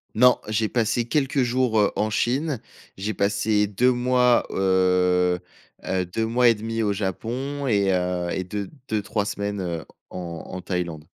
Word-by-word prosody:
Non, 125 +3 +6
j'ai 110 0 0
passé 115 0 +1
quelques 135 +1 +1
jours, 120 -2 +1
heu, 105 - +3
en 110 - 0
Chine, 130 +6 0 0.4
j'ai 105 +3 -2
passé 105 +1 +1
2 120 +6 +2
mois, 125 0 +3
heu 90 -1 +2 0.5
heu, 95 -1 0
2 110 +6 -2
mois 120 +2 +3
et 115 - +4
1/2 115 +1 -3
au 105 -2 +1
Japon 125 +8 -3
et 100 -4 +2
heu, 90 -1 -1
et 95 - -2
2- 100 +2 -5 0.2
deux-trois 105 -1 -1
semaines, 100 -1 -3
heu, 85 -3 -4 0.2
en 85 -3 -6
en 95 - -6
Thaïlande. 85 -4 -3
105 Hz, 160 wpm, -24 LUFS, 95-120 Hz, 0.5 s, Non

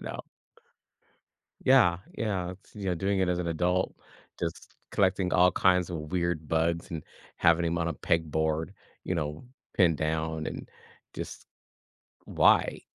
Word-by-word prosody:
You - - -9
know. - - -5 1.4
Yeah. 120 -10 +5 0.2
Yeah, 95 -5 -1
it's 95 +2 -18
you 100 -2 -6
know, 90 - +1
doing 95 +3 0
it 95 - +2
as 90 - +1
an 90 - -2
adult, 90 +2 0 0.4
just 85 -1 -5 0.2
collecting 95 -2 +1
all 90 0 +6
kinds 90 0 +3
of 75 -3 -5
weird 85 -4 -1
bugs 85 +1 0
and 80 -3 -5 0.3
having 85 +1 +4
'em 85 +1 0
on 85 - 0
a 85 - -2
pegboard, 80 +1 0 0.3
you 90 - -1
know, 75 +1 -3 0.3
pinned 85 -5 +4
down 80 +1 -2
and - - -6 0.5
just, - - -7 0.8
why? - - +3
85 Hz, 150 wpm, -28 LUFS, 80-90 Hz, 1.4 s, all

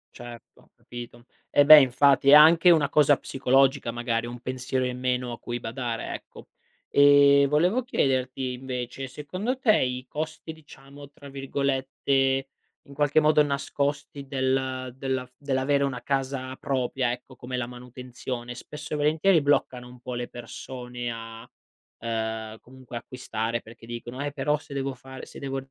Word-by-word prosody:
Certo, 120 -1 -12
ho - - -26
capito. 120 0 -10 0.2
Eh 145 - +4
beh 155 +1 +11
infatti, 135 +1 +3
è - - +9
anche 165 +4 +8
una 155 -5 +4
cosa 145 -1 +4
psicologica, 135 -1 +1
magari 120 -1 -2
un 120 +1 -7
pensiero 130 +1 -2
in 125 0 -4
meno 125 -1 -1
a 120 - -7
cui 120 0 -5
badare, 115 0 -4
ecco. - - -11 0.4
E 140 0 +6
volevo 180 - +2
chiederti 130 - -1
invece 125 +1 -5
secondo 185 - -4
te 220 -5 +4
i 125 0 -1
costi 160 +1 -5
diciamo 145 -2 -14
tra 145 - -14
virgolette 135 0 0 0.4
"in 140 - -15
qualche 145 +1 +3
modo 155 0 +4
nascosti 140 0 -3
del 130 -1 -2
della 130 -1 -2
f 125 - -27
dell'avere 140 0 0
una 130 -3 -2
casa 135 0 -2
propria" 130 -2 -1
ecco, 125 +2 -8
come 125 +1 -6
la 120 -1 -2
manutenzione, 125 0 -7
spesso 150 +4 -8
e - - +1
volentieri 155 +4 +3
bloccano 130 -3 0
un 125 0 -14
po' 125 +1 -7
le 120 0 -4
persone 120 0 -7
a, 115 0 -9 0.5
ehm, 110 -1 -4
comunque 130 -1 -10
acquistare, 115 -2 -4
perché 115 +1 -14
dicono: 120 +3 -6
"Eh 145 - -3
però 150 +1 0
se 145 - -12
devo 135 0 -2
fare 130 +1 -11
se - - -12
devo 135 -1 -4
130 Hz, 155 wpm, -26 LUFS, 125-140 Hz, 0.5 s, beh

